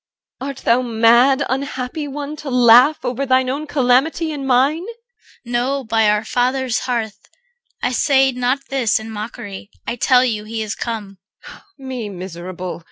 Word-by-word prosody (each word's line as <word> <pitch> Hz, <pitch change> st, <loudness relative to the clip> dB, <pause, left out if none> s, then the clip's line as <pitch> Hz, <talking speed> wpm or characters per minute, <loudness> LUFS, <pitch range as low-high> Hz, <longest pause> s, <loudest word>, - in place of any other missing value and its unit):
Art 275 Hz, 0 st, -5 dB
thou 235 Hz, +2 st, +4 dB
mad, 240 Hz, +4 st, +4 dB
unhappy 270 Hz, +2 st, -3 dB
one, 285 Hz, +1 st, -5 dB
to 300 Hz, -2 st, -7 dB
laugh 250 Hz, +4 st, +5 dB
Over 250 Hz, +2 st, -2 dB
thine 260 Hz, -1 st, +2 dB
own 295 Hz, +3 st, -4 dB
calamity 290 Hz, +5 st, +1 dB
and 280 Hz, -3 st, -5 dB
mine? 270 Hz, +6 st, +2 dB
CHR. 465 Hz, -, -16 dB
No, 260 Hz, +3 st, 0 dB
by 220 Hz, -2 st, +2 dB
our 210 Hz, +1 st, +1 dB
father's 250 Hz, +1 st, 0 dB
hearth, 220 Hz, -4 st, -2 dB, 0.6 s
I 245 Hz, -, +1 dB
say 265 Hz, +1 st, +3 dB
not 250 Hz, +2 st, -1 dB
this 255 Hz, -6 st, +1 dB
In 220 Hz, +1 st, -8 dB
mockery. 210 Hz, -2 st, -7 dB, 0.2 s
I 240 Hz, -, -3 dB
tell 250 Hz, +2 st, +4 dB
you 215 Hz, -4 st, -2 dB
he 220 Hz, +1 st, -4 dB
is 215 Hz, 0 st, -4 dB
come. 210 Hz, -5 st, -6 dB, 0.3 s
EL. -, -, -13 dB
Me 260 Hz, -5 st, -6 dB
miserable! 180 Hz, -1 st, -7 dB
250 Hz, 160 wpm, -19 LUFS, 225-275 Hz, 0.6 s, laugh